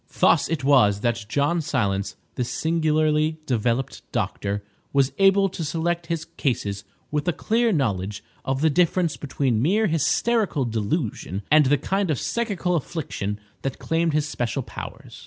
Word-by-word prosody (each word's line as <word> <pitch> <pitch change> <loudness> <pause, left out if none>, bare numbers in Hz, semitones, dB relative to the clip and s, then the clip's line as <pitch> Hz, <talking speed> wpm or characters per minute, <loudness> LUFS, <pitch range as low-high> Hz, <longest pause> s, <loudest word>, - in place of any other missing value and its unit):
Thus - - +4
it 160 -4 -2
was 105 -8 +4
that 115 -1 0
John 145 +6 +1
Silence, 100 - -1 0.2
this 125 -2 -2
singularly 155 -1 +1
developed 125 0 -1
doctor, 100 0 -2 0.3
was 140 -1 +3
able 195 0 +5
to 175 -2 -5
select 165 +2 -1
his 165 -2 -2
cases 100 -7 -1 0.3
with 150 +3 -1
a - - +4
clear 230 +6 +1
knowledge 105 - -1 0.2
of 135 +1 -1
the 160 0 +4
difference 175 0 +2
between 130 -5 -1
mere 200 - +3
hysterical 165 - +1
delusion 110 - -2
and 150 -2 +6
the 145 +2 +4
kind 195 +6 -1
of 150 - +1
psychical 200 - -1
affliction 130 - -3 0.2
that 135 -1 -3
claimed 165 -1 0
his 155 0 +1
special 125 -2 -2
powers. - - -9
150 Hz, 150 wpm, -24 LUFS, 120-170 Hz, 0.3 s, and